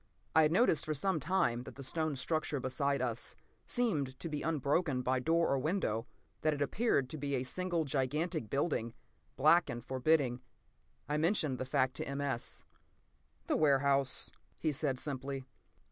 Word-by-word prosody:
I 160 - +8
had 155 0 +4
noticed 175 -5 +3
for 155 - -2
some 185 +3 +1
time 135 -7 +1
that - - -10
the 140 - -8
stone 155 +2 -1
structure 150 +2 -1
beside 135 +1 0
us 120 -1 -3 0.3
seemed 155 - 0
to 165 - -4
be 150 -1 -3
unbroken 145 -2 0
by 130 +1 +1
door 165 +5 +2
or 135 - +2
window—that 150 - -2
it - - -7
appeared 145 - +1
to 155 - -5
be 140 0 -1
a 125 - -1
single 175 +3 -1
gigantic 140 -2 -1
building, 135 -5 -1 0.4
black 170 - +5
and 120 0 -5
forbidding. 130 -1 +2 0.7
I 150 - 0
mentioned 155 -5 +1
the 130 - -2
fact 130 -1 +1
to - - -3
M. 140 0 -3
S. 135 -4 -3 0.8
"The - - +1
warehouse," 140 -2 +3 0.3
he 155 - 0
said 140 -2 -1
simply. 135 -1 -4
140 Hz, 160 wpm, -33 LUFS, 130-160 Hz, 0.8 s, I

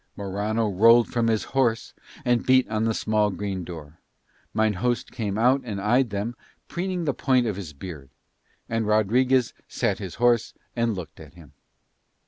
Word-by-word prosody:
Morano 105 +3 -1
rolled 115 +4 +5
from 120 -2 0
his 110 -2 +1
horse 120 -4 0 0.3
and 120 -1 +2
beat 130 0 +4
on 110 +1 0
the 115 - +1
small 105 -1 +1
green 95 -1 -4
door. 80 -3 -10 0.5
Mine 110 -1 +1
host 120 +6 -1
came 105 -4 -3
out 125 +4 +3
and 105 -5 -5
eyed 120 +5 +2
them, 105 +4 -3 0.3
preening 180 -1 -3
the 140 - +1
point 130 0 +2
of 110 -4 -1
his 95 -6 -7
beard; 75 -3 -9 0.6
and 115 -1 -1
Rodriguez 120 +4 +2
sat 115 -6 -1
his 95 -4 -6
horse 120 -2 +2 0.2
and 115 -2 0
looked 90 -4 -8
at 80 -1 -13
him. 80 -5 -16
110 Hz, 165 wpm, -25 LUFS, 100-120 Hz, 0.6 s, rolled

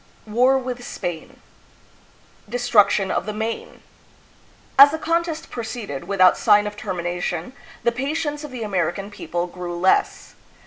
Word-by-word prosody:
War 250 +5 +3
with 250 -2 -5
Spain. 175 -8 -6 1.1
Destruction 220 -5 +3
of - - -1
the 215 - -3
"Maine." 220 +1 -4 1.0
As 280 +1 +11
the 315 - -3
contest 330 0 -2
proceeded 220 - -5
without 185 -2 +4
sign 205 0 +5
of 210 0 -5
termination, 175 +1 -3 0.3
the 235 - +3
patience 295 +4 -3
of 300 - -6
the 250 -3 -6
American 195 0 -2
people 175 -3 -3
grew 175 -1 -6
less. 185 +2 +1
215 Hz, 130 wpm, -22 LUFS, 180-255 Hz, 1.1 s, As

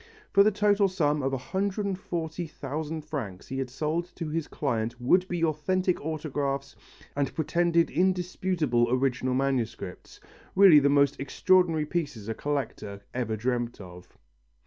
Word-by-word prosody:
For 200 - +6
the 205 - +6
total 205 -1 +3
sum 150 -6 0
of 135 0 0
140,000 165 - -3
francs 120 -12 -5
he 135 0 -3
had 130 -1 -2
sold 155 +6 -2
to 165 -3 -4
his 160 0 -2
client 115 -4 -2
would 180 +10 +3
be 175 -2 -2
authentic 180 +3 0
autographs 145 -3 -3 0.4
and 140 -2 0
pretended 170 +1 +2
indisputable 180 -8 +1
original 130 0 +1
manuscripts 130 -8 -2 0.4
really 190 -6 +8
the 140 0 +3
most 140 -1 +3
extraordinary 165 +3 +2
pieces 145 -10 -3
a 115 - -1
collector 115 -7 -4
ever 120 -3 -1
dreamt 120 +1 -2
of! 90 -2 -12
150 Hz, 130 wpm, -27 LUFS, 130-175 Hz, 0.4 s, really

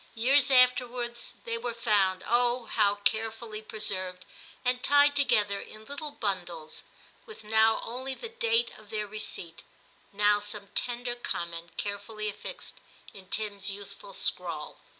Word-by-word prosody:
Years 260 +4 +6
afterwards 250 -2 +3
they 230 0 -3
were 240 0 -3
found, 200 -5 +2
oh! 240 +1 +2
how 205 -2 +2
carefully 220 +1 -1
preserved, 185 -4 -3 0.4
and 250 0 +2
tied 285 +1 +5
together 210 -8 +3
in 215 0 -11
little 285 +3 -5
bundles, 175 - -3 0.5
with 440 - -10
now 220 +1 +4
only 260 +3 -4
the 465 - -6
date 465 0 +2
of 215 -1 -17
their 215 -1 -1
receipt, 200 -5 -3 0.5
now 205 +1 +4
some 205 -1 -3
tender 245 0 -2
com 175 -8 -3
ment 170 0 -7
carefully 210 +1 -3
affixed 205 - -6 0.4
in 190 -2 -12
Tim's 205 -2 -1
youthful 205 - -8
scrawl. - - -2
220 Hz, 135 wpm, -29 LUFS, 205-250 Hz, 0.5 s, Years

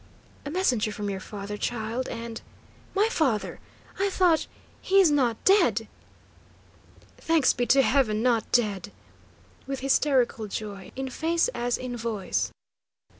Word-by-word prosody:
"A - - -3
messenger 255 - +1
from 205 -1 -4
your 190 - -4
father, 205 +1 -7
child, 235 +2 -3
and 230 -1 -6 0.3
" - - -28
"My 410 +3 +4
father? 265 - 0 0.4
I 395 +1 +2
thought 360 -4 +2 0.3
he 390 +1 +3
is 360 -6 +6
not 250 -6 +2
not - - -30
dead?" 395 +2 +4 1.3
"Thanks 325 -4 +3
be 245 0 -1
to 270 +1 +5
heaven, 230 -6 +2
not 235 -3 +1
dead!" 205 -4 +1 0.8
with 275 -1 -4
hysterical 260 -5 +2
joy 200 -2 -6
in 265 0 -4
face 335 - +1
as 245 - -1
in 250 -1 -5
voice. 225 -4 -2
245 Hz, 140 wpm, -26 LUFS, 215-295 Hz, 1.3 s, is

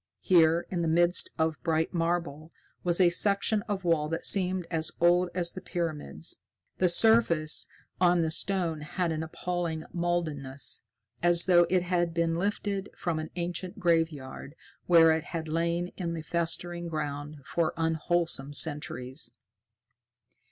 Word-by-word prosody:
Here, 170 -2 +4
in 175 -2 -1
the 165 - 0
midst 175 +2 +3
of 160 -5 -1
bright 160 +3 0
marble, 165 -2 -2 0.3
was 175 0 +2
a 175 -2 +5
section 200 +3 +1
of 195 -2 -2
wall 160 -3 +1
that 165 +1 -3
seemed 185 -2 +2
as 160 -2 -1
old 175 +1 +4
as 175 -2 +1
the 185 - -8
pyramids. 150 - -2 0.4
The 185 - +4
surface 170 -6 +3 0.3
of 175 -1 +4
the 160 - -1
stone 170 -3 0
had 170 +3 -2
an 160 0 -2
appalling 165 0 -4
mouldiness, 155 -6 -1 0.4
as 175 0 +4
though 175 -2 +5
it 180 0 +2
had 175 -2 -1
been 165 -1 +1
lifted 200 +1 -2
from 170 -3 -2
an 155 - -5
ancient 175 +1 -4
graveyard 160 -5 -1 0.3
where 165 -2 +7
it 160 +1 0
had 165 -2 -5
lain 170 +2 -1
in 170 -3 -3
the 160 - -6
festering 170 +1 -2
ground 150 -1 -4
for 165 +2 0
unwholesome 160 -3 -1
centuries. 145 -3 0
170 Hz, 145 wpm, -28 LUFS, 160-175 Hz, 0.4 s, where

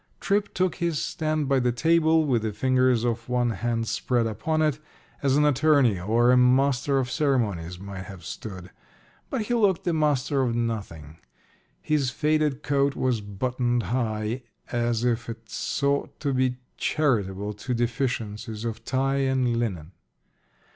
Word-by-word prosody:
Tripp 200 +1 0
took 185 -1 0
his 170 -4 -1
stand 155 -2 -1
by 135 -1 +3
the 125 -1 +1
table, 160 +4 +3
with 125 -6 +1
the 110 -1 -2
fingers 130 +1 +2
of 120 0 -2
one 125 -1 +1
hand 115 0 -2
spread 120 0 0
upon 155 +8 -1
it, 150 -2 +1 0.4
as 135 -1 +2
an 150 - +4
attorney 140 - +3
or 115 +6 +3
a 125 - +5
master 135 +2 +3
of 125 -2 -1
ceremonies 105 - 0
might 95 0 -8
have 95 -2 -11
stood. 95 -4 -8 0.6
But 220 - -1
he 240 - -2
looked 205 -7 +2
the 175 - 0
master 145 -3 +1
of 120 -3 0
nothing. 95 -10 -4 0.6
His 150 -4 +1
faded 150 0 0
coat 140 0 +1
was 125 -4 0
buttoned 120 +4 -1
high, 110 -1 -1 0.3
as 120 -1 0
if 120 -1 0
it 115 -1 -9
sought 140 0 -1
to 140 -2 0
be 130 -1 +1 0.2
charitable 105 -9 0
to 120 +5 -4
deficiencies 115 -3 -2
of 115 -1 -4
tie 135 +2 0
and 130 -3 +1
linen. 95 -9 -3
125 Hz, 155 wpm, -25 LUFS, 115-140 Hz, 0.6 s, a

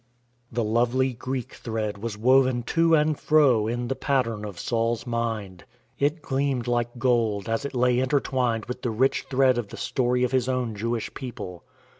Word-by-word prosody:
The 120 0 -1
lovely 120 +4 +1
Greek 130 0 -5
thread 110 -3 -4
was 110 -1 -4
woven 130 +1 +3
to 165 0 +4
and 150 -1 +1
fro 135 -9 +4
in 120 +1 -2
the 135 - -1
pattern 115 -7 0
of 100 -4 -7
Saul's 115 0 -1
mind. 110 -6 -3 0.4
It 150 +3 0
gleamed 135 -3 -1
like 120 0 -1
gold, 115 -5 +1
as 115 +5 -1
it 140 - -5
lay 125 0 +3
intertwined 130 -4 0
with 125 +1 -6
the 125 - -1
rich 130 +5 +1
thread 130 -2 +3
of 115 - -4
the - - -10
story 125 -2 0
of 125 - +1
his 130 -1 +1
own 125 -3 -1
Jewish 115 +2 -3
people. 100 -9 -7
120 Hz, 175 wpm, -25 LUFS, 115-130 Hz, 0.4 s, to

